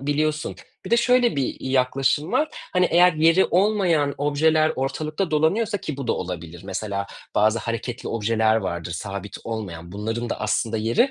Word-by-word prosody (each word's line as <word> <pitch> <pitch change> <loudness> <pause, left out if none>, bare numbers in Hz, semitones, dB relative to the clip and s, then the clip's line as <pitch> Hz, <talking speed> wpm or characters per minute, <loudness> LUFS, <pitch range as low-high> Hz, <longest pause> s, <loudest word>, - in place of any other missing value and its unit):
biliyorsun. 150 +2 -1 0.3
Bir 185 - -7
de 235 - +5
şöyle 245 - +3
bir, 135 - +1 0.2
iii, 130 - -4
yaklaşım 135 +4 +1
var, 310 0 +2 0.2
hani, 180 -1 +3
eğer 180 +1 +6
yeri 165 +4 +4
olmayan 180 -7 +2
objeler 155 +2 +2
ortalıkta 155 +6 -2
dolanıyorsa 200 +8 +1
ki 155 -4 -5
bu 140 -3 -5
da - - +2
olabilir, 85 -1 -6
mesela 100 0 -3 0.3
bazı 110 +2 +3
hareketli 115 +1 -4
objeler 110 0 +2
vardır 85 -5 -3
sabit 100 +1 -6
olmayan, 90 -6 -6
bunların 115 +3 -3
da - - -3
aslında 110 +1 0
yeri 115 - +2
135 Hz, 160 wpm, -23 LUFS, 110-165 Hz, 0.3 s, eğer